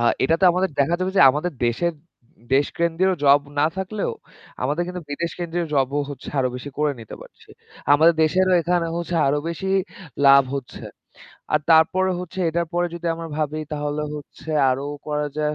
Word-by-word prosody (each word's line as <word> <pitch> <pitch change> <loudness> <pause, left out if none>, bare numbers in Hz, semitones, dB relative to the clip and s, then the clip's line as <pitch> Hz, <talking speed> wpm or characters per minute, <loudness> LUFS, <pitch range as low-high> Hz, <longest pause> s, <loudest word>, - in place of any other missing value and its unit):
আ - - 0 0.2
এটাতে 165 +7 +2
আমাদের 185 +1 0
দেখা 145 +5 +2
যাবে 185 +1 0
যে - - +5
আমাদের 155 +6 -3
দেশের 170 +9 0 0.6
দেশ 140 +2 +3
কেন্দ্রীয় 170 +3 +2
জব 140 +1 +6 0.2
না 145 - +4
থাকলেও, 195 +2 -3 0.5
আমাদের 145 +6 0
কিন্তু 180 0 -6
বিদেশ 170 +4 -2
কেন্দ্রীয় 175 0 -2
জব 135 -1 +2 0.2
হচ্ছে 140 - -9
আরো 130 -1 +2
বেশি 145 +3 -8
করে 150 -1 +1
নিতে 110 - -9
পারছি। - - -16 0.4
আমাদের 160 +3 +5
দেশেরও 185 +4 +2
এখানে 175 0 0 0.4
আরো 145 - +1
বেশি 180 +3 -4 0.6
লাভ 140 0 +8
হচ্ছে। 135 -3 -7 0.7
আর 150 - +3
তারপরে 180 +4 +4
হচ্ছে 180 +1 -8
এটার 170 +1 -1
পরে 175 0 +1
যদি 170 0 -6
আমরা 165 0 -7
ভাবি 155 0 -2
তাহলে 150 0 -2
হচ্ছে 150 +1 -9 0.2
আরও 135 +2 -2 0.2
করা 150 0 -1
যায়। 150 0 0
160 Hz, 170 wpm, -22 LUFS, 145-175 Hz, 0.7 s, লাভ